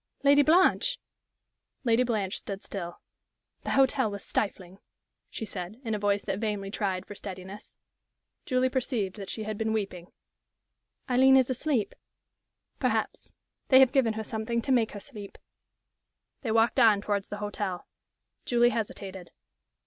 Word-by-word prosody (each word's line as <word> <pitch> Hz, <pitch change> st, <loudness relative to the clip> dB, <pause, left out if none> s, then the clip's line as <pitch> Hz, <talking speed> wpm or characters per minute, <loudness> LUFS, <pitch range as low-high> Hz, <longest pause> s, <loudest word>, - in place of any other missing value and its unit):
"Lady 285 Hz, +1 st, +6 dB
Blanche!" 370 Hz, -, +4 dB, 0.9 s
Lady 235 Hz, -1 st, +3 dB
Blanche 215 Hz, -6 st, -1 dB
stood 195 Hz, -1 st, -7 dB
still. 175 Hz, -3 st, -6 dB, 0.6 s
"The -, -, -5 dB
hotel 265 Hz, -5 st, +3 dB
was 200 Hz, -1 st, -6 dB
stifling," 190 Hz, -2 st, -3 dB, 0.5 s
she 220 Hz, -, -5 dB
said, 195 Hz, +2 st, -7 dB
in 225 Hz, -, -1 dB
a 210 Hz, -, -1 dB
voice 200 Hz, 0 st, +1 dB
that 195 Hz, -1 st, -3 dB
vainly 205 Hz, -3 st, -2 dB
tried 190 Hz, -3 st, -2 dB
for -, -, -9 dB
steadiness. 195 Hz, +1 st, -9 dB, 0.7 s
Julie 255 Hz, -1 st, +2 dB
perceived 235 Hz, -7 st, -2 dB
that 195 Hz, -2 st, -7 dB
she 220 Hz, -, -4 dB
had 215 Hz, -1 st, -5 dB
been 220 Hz, 0 st, 0 dB
weeping. 190 Hz, -5 st, -4 dB, 1.0 s
"Aileen 265 Hz, +1 st, +6 dB
is 260 Hz, -1 st, +3 dB
asleep?" 255 Hz, -3 st, -1 dB, 0.9 s
"Perhaps. -, -, -1 dB, 0.3 s
They 260 Hz, -, +7 dB
have 265 Hz, -2 st, +6 dB
given 245 Hz, -5 st, +2 dB
her 220 Hz, 0 st, -4 dB
something 220 Hz, +2 st, -2 dB
to 275 Hz, -, -1 dB
make 235 Hz, -4 st, +2 dB
her 205 Hz, -, -6 dB
sleep." 205 Hz, -4 st, -10 dB, 1.0 s
They 245 Hz, -, -3 dB
walked 225 Hz, +1 st, +3 dB
on 215 Hz, -3 st, +6 dB
towards 200 Hz, -1 st, -1 dB
the 205 Hz, -, -6 dB
hotel. 205 Hz, -3 st, -4 dB, 0.6 s
Julie 240 Hz, 0 st, +3 dB
hesitated. 195 Hz, -5 st, -5 dB
215 Hz, 145 wpm, -28 LUFS, 200-245 Hz, 1.0 s, They